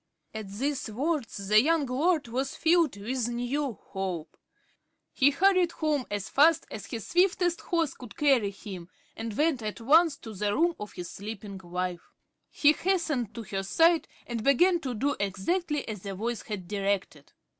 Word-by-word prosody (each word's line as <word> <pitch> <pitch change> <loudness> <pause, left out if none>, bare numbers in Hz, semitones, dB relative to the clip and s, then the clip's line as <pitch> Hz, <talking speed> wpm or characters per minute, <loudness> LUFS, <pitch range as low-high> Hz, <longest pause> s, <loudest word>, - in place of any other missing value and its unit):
At 220 -2 -6
these 265 +6 -2
words 275 +3 -2
the 215 +1 +6
young 320 +2 +2
lord 290 +3 +1
was 260 +4 -2
filled 330 -7 +3
with 235 +4 -2
new 245 +3 -2
hope. 190 -5 -5 0.8
He 275 0 +5
hurried 360 +3 +3
home 300 -5 -1
as 205 0 -3
fast 310 +3 +4
as 215 - -7
his 225 -3 -6
swiftest 355 -1 +2
horse 330 -6 0
could 245 -5 -12
carry 270 -8 +3
him, 190 -3 -9 0.3
and 225 -2 -5
went 300 -4 +2
at 215 0 -4
once 305 +5 +4
to 225 - -9
the 205 +1 -1
room 345 +2 +3
of 210 - -7
his 175 0 -7
sleeping 200 -1 -7
wife. 180 -1 -4 0.4
He 295 - +4
hastened 310 - -1
to 230 - -5
her 195 -1 -3
side, 325 - +3 0.2
and 235 -2 -4
began 345 +7 +4
to 260 -6 -4
do 285 +6 0
exactly 295 - -1
as 210 -4 -5
the 195 0 -5
voice 230 +4 -3
had 195 -5 -6
directed. 195 -7 -2
245 Hz, 165 wpm, -28 LUFS, 205-310 Hz, 0.8 s, the